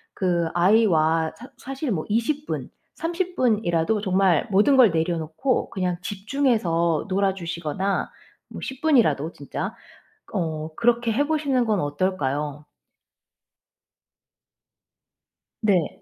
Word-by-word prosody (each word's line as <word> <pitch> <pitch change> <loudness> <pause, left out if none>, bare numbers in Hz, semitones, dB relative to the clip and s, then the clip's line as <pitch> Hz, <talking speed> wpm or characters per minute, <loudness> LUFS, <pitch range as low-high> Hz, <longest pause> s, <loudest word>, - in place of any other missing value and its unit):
그 175 -3 +1
아이와 165 -5 +3
사 245 - -11
사실 270 0 -4
뭐 160 -5 -2
20 280 +7 0
분, - - -4 0.3
30 350 +2 -3
분이라도 210 -4 +1
정말 190 -4 +2
모든 215 +8 +4
걸 240 -5 +7
내려 165 +1 0
놓고 160 - -1
그냥 180 -2 -1
집중해서 195 - 0
놀아 195 0 +1
주시거나 170 +2 -2 0.4
뭐 - - -8
10 265 +1 -6
분이라도 175 - +3
진짜 140 - -5 0.6
어 160 -2 -2
그렇게 235 +1 +2
해 285 +6 +1
보시는 285 -6 +1
건 210 -3 +1
어떨까요? 145 -2 -2 3.0
네. 180 -7 +1
190 Hz, 205 characters per minute, -24 LUFS, 165-240 Hz, 3.0 s, 걸